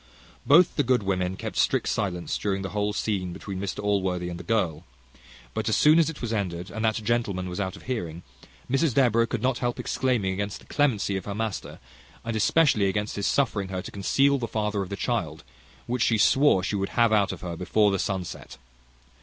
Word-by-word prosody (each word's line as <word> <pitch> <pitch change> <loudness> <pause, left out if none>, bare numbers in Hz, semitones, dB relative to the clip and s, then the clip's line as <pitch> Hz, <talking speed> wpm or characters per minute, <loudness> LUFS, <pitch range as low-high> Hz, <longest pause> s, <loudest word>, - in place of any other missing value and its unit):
Both 170 +5 +5
the 145 - +3
good 125 -3 +2
women 95 -1 -1
kept - - -6
strict - - +2
silence 90 -5 -2
during 100 -2 -1
the 95 - -3
whole 105 0 0
scene 95 -4 -2
between 95 +1 -6
Mr 100 +1 -4
Allworthy 95 -3 0
and 85 0 -6
the - - -8
girl; 85 -6 0 0.7
but - - -1
as - - +2
soon 155 +2 +6
as 165 - +3
it 160 - -8
was 115 -1 -2
ended, 90 -3 -3
and 110 +2 -4
that 110 -1 +2
gentleman 105 -5 -1
was 90 +1 -5
out 95 -2 -2
of - - -13
hearing, 85 -10 -4 0.4
Mrs 135 0 +1
Deborah 115 -4 +3
could 110 - -3
not 130 -1 +1
help 120 -1 -2
exclaiming 120 -8 0
against 100 +1 -3
the - - -18
clemency 110 -9 +1
of 95 - -6
her 100 - -4
master, 110 -1 -4 0.5
and 115 -1 -2
especially 110 -2 +3
against 105 +2 -2
his 100 - -1
suffering 105 -8 +1
her 95 -1 -4
to - - -8
conceal 140 +8 +2
the 120 - -3
father 105 -2 -1
of 95 - -5
the 100 - -3
child, - - -2 0.4
which 125 0 -2
she 115 - +3
swore 130 -2 +4
she 100 - -1
would 95 0 -1
have 115 -2 +4
out 100 -2 +3
of - - -8
her 85 -2 -5
before 100 +4 +2
the 100 - 0
sun 95 -1 -1
set. - - -9
105 Hz, 215 wpm, -26 LUFS, 95-120 Hz, 0.7 s, soon